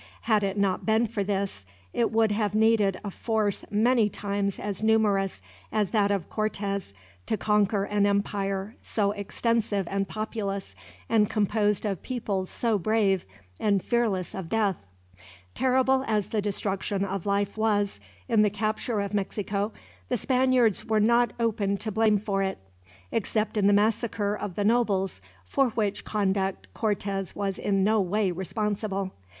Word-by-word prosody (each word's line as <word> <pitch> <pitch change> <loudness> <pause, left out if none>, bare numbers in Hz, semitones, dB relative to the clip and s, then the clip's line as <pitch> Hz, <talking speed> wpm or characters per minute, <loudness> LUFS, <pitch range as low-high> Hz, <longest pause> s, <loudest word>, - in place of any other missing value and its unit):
Had 215 -3 +2
it 195 0 -1
not 195 -2 +1
been 220 +1 +3
for 215 -2 -2
this, 195 - -2 0.3
it 235 - +1
would 220 -1 +3
have 210 -1 0
needed 215 -4 +3
a 200 - -4
force 215 -1 -1
many 220 +1 +3
times 200 -1 -2
as 205 -2 -4
numerous 205 - +2 0.3
as 210 -3 0
that 205 -3 +3
of 200 -5 -1
Cortez 200 - -2 0.3
to 220 - 0
conquer 210 -1 +2
an 205 0 +2
empire 200 0 -1
so 200 -2 0
extensive 205 -1 -1
and 195 0 0
populous, 210 -2 -4 0.3
and 220 -2 +3
composed 210 -1 +1
of 195 -4 -2
peoples 205 -7 -3
so 225 -4 0
brave 195 - +1 0.3
and 200 -3 +2
fearless 220 -7 0
of 190 -5 -6
death. 210 -5 +1 0.8
Terrible 260 +1 +2
as 210 -3 0
the 215 - 0
destruction 200 -1 -2
of 195 -1 -4
life 200 0 0
was, 205 - +1 0.3
in 220 - +4
the 210 - +4
capture 215 +2 -1
of 200 0 -4
Mexico, 200 +1 -1 0.4
the - - +1
Spaniards 255 -5 +2
were 220 -1 +1
not 235 +3 +4
open 205 -4 +1
to 215 +2 -4
blame 215 0 +3
for 200 -1 -1
it; 190 0 -1 0.5
except 215 0 -1
in 205 -2 +3
the - - +6
massacre 210 0 +1
of 205 -3 -5
the 205 - 0
nobles, 200 - +1 0.2
for 255 - +2
which 215 -3 -1
conduct 190 - -1
Cortez 200 - -2
was 195 -2 -2
in 195 -1 +1
no 215 +1 +3
way 195 +1 +1
responsible. 195 +1 -2
205 Hz, 155 wpm, -27 LUFS, 195-220 Hz, 0.8 s, the